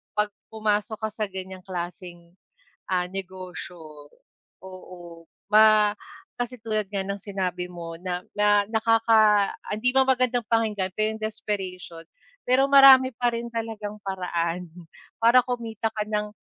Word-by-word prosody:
pag 210 Hz, 0 st, +1 dB, 0.2 s
pumasok 215 Hz, 0 st, -1 dB
ka -, -, -6 dB
sa 215 Hz, 0 st, -3 dB
ganyang 190 Hz, 0 st, -8 dB
klaseng, 175 Hz, -1 st, -7 dB, 0.6 s
ah, 180 Hz, -1 st, +1 dB
negosyo, 180 Hz, -5 st, -9 dB, 0.6 s
oo. 175 Hz, -2 st, -11 dB, 0.3 s
Ma 215 Hz, -1 st, +6 dB, 0.4 s
kasi 245 Hz, 0 st, -5 dB
tulad 215 Hz, -1 st, -1 dB
nga 200 Hz, -, -1 dB
ng 200 Hz, +1 st, -3 dB
sinabi 185 Hz, -3 st, -4 dB
mo 170 Hz, -2 st, -8 dB
na 180 Hz, +1 st, -4 dB, 0.2 s
na 205 Hz, -1 st, +3 dB
nakaka 220 Hz, -2 st, +3 dB
ah, -, -, -9 dB
hindi 215 Hz, +4 st, 0 dB
man 265 Hz, -, +6 dB
magandang 255 Hz, -2 st, +1 dB
pakinggan 210 Hz, -5 st, 0 dB
pero 215 Hz, 0 st, +1 dB
'yung 220 Hz, 0 st, -9 dB
desperation. 190 Hz, -6 st, -5 dB, 0.4 s
Pero 255 Hz, +2 st, +3 dB
marami 270 Hz, -2 st, +8 dB
pa 245 Hz, -1 st, +1 dB
rin 235 Hz, 0 st, -4 dB
talagang 220 Hz, -2 st, -5 dB
paraan 180 Hz, -2 st, -2 dB, 0.6 s
para 235 Hz, +2 st, +6 dB
kumita 230 Hz, -3 st, -3 dB
ka 215 Hz, -1 st, -3 dB
ng 210 Hz, 0 st, -1 dB
210 Hz, 135 wpm, -25 LUFS, 185-225 Hz, 0.6 s, marami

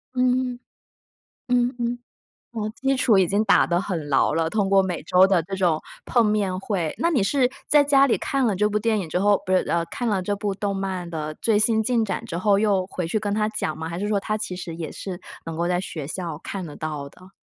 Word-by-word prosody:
嗯， 250 Hz, 0 st, +1 dB, 0.9 s
嗯 245 Hz, 0 st, +2 dB
嗯， 240 Hz, +1 st, -1 dB, 0.5 s
哦， 215 Hz, -2 st, -3 dB
基 270 Hz, -1 st, 0 dB
础 225 Hz, -6 st, +4 dB
已 185 Hz, -2 st, +4 dB
经 205 Hz, +4 st, +1 dB
打 205 Hz, -, +4 dB
得 175 Hz, 0 st, +1 dB
很 165 Hz, -7 st, -4 dB
牢 135 Hz, +2 st, +3 dB
了， 165 Hz, 0 st, +1 dB
通 200 Hz, -1 st, 0 dB
过 195 Hz, -1 st, +5 dB
每 180 Hz, -5 st, -3 dB
周 185 Hz, +3 st, +5 dB
的 180 Hz, -5 st, +2 dB
这 195 Hz, +3 st, -5 dB
种 175 Hz, -5 st, +2 dB, 0.3 s
碰 235 Hz, -3 st, +3 dB
面 200 Hz, -3 st, 0 dB
会。 185 Hz, -6 st, -2 dB
那 335 Hz, -, +1 dB
你 265 Hz, -, +2 dB
是 255 Hz, +4 st, +2 dB, 0.2 s
在 295 Hz, -1 st, +5 dB
家 275 Hz, -1 st, +5 dB
里 -, -, +2 dB
看 270 Hz, -2 st, 0 dB
了 200 Hz, -, +1 dB
这 210 Hz, +3 st, +2 dB
部 210 Hz, 0 st, 0 dB
电 220 Hz, -1 st, +1 dB
影 175 Hz, -, -4 dB
之 180 Hz, -, -1 dB
后 205 Hz, 0 st, +3 dB
不 185 Hz, -, -3 dB
是， 185 Hz, -, +5 dB
呃， 170 Hz, 0 st, +1 dB
看 245 Hz, -, -3 dB
了 195 Hz, -4 st, +1 dB
这 205 Hz, +2 st, -1 dB
部 200 Hz, -1 st, -2 dB
动 200 Hz, 0 st, -2 dB
漫 190 Hz, -2 st, -3 dB
的 155 Hz, -2 st, -4 dB
最 215 Hz, -2 st, +3 dB
新 220 Hz, 0 st, +3 dB
进 235 Hz, -1 st, +2 dB
展 205 Hz, -, -3 dB
之 170 Hz, -, -5 dB
后， 200 Hz, +2 st, +3 dB
又 200 Hz, -3 st, +1 dB
回 180 Hz, -3 st, -4 dB
去 215 Hz, +5 st, 0 dB
跟 205 Hz, -1 st, -2 dB
她 210 Hz, 0 st, +1 dB
讲 155 Hz, -7 st, -3 dB
吗？ 160 Hz, 0 st, -4 dB
还 170 Hz, +2 st, -5 dB
是 205 Hz, -, -2 dB
说 205 Hz, -2 st, +1 dB
她 215 Hz, +2 st, -2 dB
其 200 Hz, -4 st, -4 dB
实 170 Hz, -2 st, -6 dB
也 165 Hz, -2 st, -5 dB
是 185 Hz, -3 st, -6 dB, 0.3 s
能 165 Hz, -1 st, -5 dB
够 170 Hz, +1 st, -1 dB
在 180 Hz, 0 st, +1 dB
学 155 Hz, -6 st, -6 dB
校 165 Hz, -3 st, -5 dB
看 190 Hz, -3 st, -5 dB
得 150 Hz, -, -9 dB
到 150 Hz, -3 st, -5 dB
的。 185 Hz, +5 st, -17 dB
195 Hz, 265 characters per minute, -24 LUFS, 175-220 Hz, 0.9 s, 过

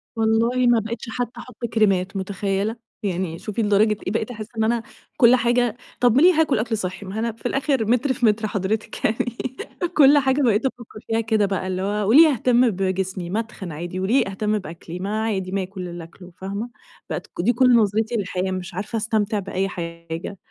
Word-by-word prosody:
والله 230 Hz, +3 st, +2 dB
ما 240 Hz, -1 st, +5 dB
بقتش 225 Hz, +2 st, -5 dB
حتى 240 Hz, +1 st, -4 dB
أحط 245 Hz, -1 st, -7 dB
كريمات، 195 Hz, -3 st, +2 dB
متخيلة؟ 195 Hz, +2 st, -2 dB, 0.3 s
يعني، 180 Hz, -3 st, -2 dB
شوفي 215 Hz, +1 st, -3 dB
لدرجة 210 Hz, 0 st, +3 dB
إيه -, -, 0 dB
بقيت 225 Hz, +2 st, -1 dB
أحس 215 Hz, -2 st, -7 dB
إن 220 Hz, -, +2 dB
أنا 230 Hz, +1 st, +1 dB, 0.3 s
كل 250 Hz, -2 st, +7 dB
حاجة، 245 Hz, -2 st, +1 dB, 0.2 s
طب 245 Hz, -2 st, +4 dB
م -, -, +6 dB
ليه 360 Hz, +4 st, +7 dB
هاكل 310 Hz, -7 st, +2 dB
أكل 220 Hz, 0 st, -1 dB
صحي؟ 185 Hz, -1 st, -5 dB
ما 190 Hz, +1 st, -7 dB
هو -, -, -2 dB
أنا 230 Hz, +1 st, 0 dB
في 225 Hz, -, -21 dB
الأخر 270 Hz, -2 st, +1 dB
متر 250 Hz, +4 st, +2 dB
في 240 Hz, -, 0 dB
متر 215 Hz, 0 st, +2 dB
حضرتِك 205 Hz, +1 st, -2 dB
يعني، 230 Hz, +2 st, 0 dB, 0.6 s
كل 290 Hz, 0 st, +7 dB
حاجة 265 Hz, +1 st, +2 dB
بقيت 230 Hz, -3 st, +2 dB
أفكر 240 Hz, -4 st, -5 dB
فيها 225 Hz, 0 st, +1 dB
كده 220 Hz, -2 st, +2 dB
بقى 190 Hz, -1 st, -2 dB
اللي 185 Hz, 0 st, -2 dB
هو: 205 Hz, +1 st, -1 dB
وليه 310 Hz, +8 st, +8 dB
أهتم 245 Hz, 0 st, +3 dB
بجسمي؟ 190 Hz, -2 st, -2 dB
ما 205 Hz, +5 st, 0 dB
اتخن 215 Hz, -6 st, -6 dB
عادي، 175 Hz, +4 st, -5 dB
وليه 215 Hz, +7 st, +2 dB
أهتم 210 Hz, +2 st, -1 dB
بأكلي؟ 170 Hz, -1 st, -8 dB
ما 210 Hz, +4 st, -2 dB
عادي 190 Hz, -4 st, -2 dB
ما 195 Hz, -1 st, 0 dB
آكل 185 Hz, -1 st, -7 dB
اللي 175 Hz, -1 st, -7 dB
أكله، 180 Hz, +2 st, -14 dB
فاهمة؟ 200 Hz, +5 st, -4 dB, 0.4 s
بقت -, -, -4 dB
ك -, -, -5 dB
دي 235 Hz, +7 st, +3 dB
كل 250 Hz, +1 st, +5 dB
نظرتي 220 Hz, +1 st, +2 dB
للحياة، 190 Hz, -2 st, -2 dB
مش 185 Hz, -1 st, -5 dB
عارفة 210 Hz, +5 st, -3 dB
أستمتع 215 Hz, -1 st, 0 dB
بأي 195 Hz, 0 st, -2 dB
حاجة، 170 Hz, +1 st, -6 dB
215 Hz, 200 wpm, -22 LUFS, 190-235 Hz, 0.6 s, وليه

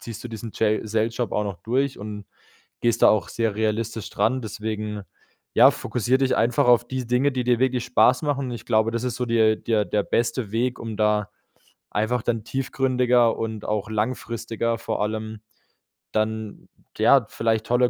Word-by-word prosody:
ziehst 115 Hz, 0 st, -8 dB
du -, -, -5 dB
diesen 115 Hz, 0 st, -7 dB
Jail 110 Hz, 0 st, +1 dB
Sales 110 Hz, +1 st, -1 dB
Job 120 Hz, -4 st, -1 dB
auch 105 Hz, -, 0 dB
noch 100 Hz, -3 st, -5 dB
durch 130 Hz, +4 st, 0 dB
und 105 Hz, -1 st, -7 dB, 0.5 s
gehst 120 Hz, -1 st, +1 dB
da -, -, +8 dB
auch 105 Hz, -5 st, +1 dB
sehr 115 Hz, -3 st, -1 dB
realistisch 110 Hz, 0 st, -2 dB
dran. 130 Hz, +5 st, 0 dB
Deswegen, 105 Hz, -1 st, -4 dB, 0.5 s
ja, -, -, +8 dB
fokussier 125 Hz, +2 st, 0 dB
dich 135 Hz, -1 st, +1 dB
einfach 120 Hz, +1 st, +2 dB
auf 120 Hz, -1 st, +5 dB
die 130 Hz, -1 st, -4 dB
Dinge, 125 Hz, +4 st, +2 dB
die 125 Hz, -2 st, -2 dB
dir 120 Hz, -1 st, +2 dB
wirklich 130 Hz, -2 st, +1 dB
Spaß 125 Hz, +2 st, +3 dB
machen 140 Hz, -2 st, -1 dB
und -, -, -5 dB
ich 120 Hz, -1 st, -7 dB
glaube, 110 Hz, -1 st, +2 dB
das 115 Hz, +1 st, -2 dB
ist 125 Hz, -2 st, -2 dB
so 125 Hz, -, -1 dB
der 110 Hz, -2 st, +3 dB
der 110 Hz, -3 st, 0 dB
der 105 Hz, -1 st, 0 dB
beste 115 Hz, -2 st, -1 dB
Weg, 125 Hz, +2 st, 0 dB
um 115 Hz, -2 st, -5 dB
da 105 Hz, -1 st, +1 dB, 0.6 s
einfach 110 Hz, +3 st, 0 dB
dann 115 Hz, -2 st, -1 dB
tiefgründiger 125 Hz, -2 st, +1 dB
und 110 Hz, -1 st, -4 dB
auch 105 Hz, 0 st, -2 dB
langfristiger 115 Hz, 0 st, -2 dB
vor -, -, -3 dB
allem 110 Hz, 0 st, -3 dB, 0.7 s
dann, 110 Hz, -1 st, -3 dB, 0.3 s
ja, -, -, +5 dB
vielleicht 110 Hz, -1 st, 0 dB
tolle 125 Hz, 0 st, +3 dB
115 Hz, 180 wpm, -24 LUFS, 110-125 Hz, 0.7 s, da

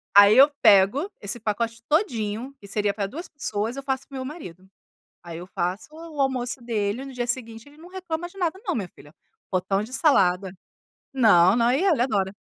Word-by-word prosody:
Aí 205 Hz, +2 st, +8 dB
eu 275 Hz, +3 st, +8 dB
pego 205 Hz, -, +5 dB
esse 200 Hz, +4 st, -3 dB
pacote 230 Hz, +2 st, -3 dB
todinho, 250 Hz, -, -1 dB
que 200 Hz, -, -13 dB
seria 205 Hz, 0 st, -1 dB
para 200 Hz, -1 st, -3 dB
2 330 Hz, -, -8 dB
pessoas, 225 Hz, -5 st, -3 dB
eu 275 Hz, -, -6 dB
faço 270 Hz, 0 st, -3 dB
para 275 Hz, -, -12 dB
o -, -, -4 dB
meu 260 Hz, -, -5 dB
marido. 190 Hz, -, -10 dB, 0.6 s
Aí 170 Hz, -1 st, -8 dB
eu 180 Hz, -, -9 dB
faço 180 Hz, +1 st, -3 dB
o 320 Hz, -2 st, -8 dB
almoço 255 Hz, -2 st, -1 dB
dele, 225 Hz, +1 st, -2 dB
no 275 Hz, -, -9 dB
dia 245 Hz, -1 st, -3 dB
seguinte 230 Hz, 0 st, -5 dB
ele 290 Hz, -, -19 dB
não 330 Hz, +3 st, -14 dB
reclama 350 Hz, -2 st, -5 dB
de 390 Hz, -, -16 dB
nada 360 Hz, 0 st, -1 dB
não, 365 Hz, -5 st, -1 dB
minha 195 Hz, -5 st, -3 dB
filha, 145 Hz, -2 st, -18 dB, 0.4 s
potão 190 Hz, +1 st, 0 dB
de 225 Hz, +4 st, -9 dB
salada. 190 Hz, -, +2 dB, 0.6 s
Não, 210 Hz, -6 st, +5 dB
não, 235 Hz, 0 st, +3 dB
e 260 Hz, -, +2 dB
ele 320 Hz, -10 st, +3 dB
adora. 200 Hz, -7 st, 0 dB
235 Hz, 200 wpm, -24 LUFS, 200-275 Hz, 0.6 s, Aí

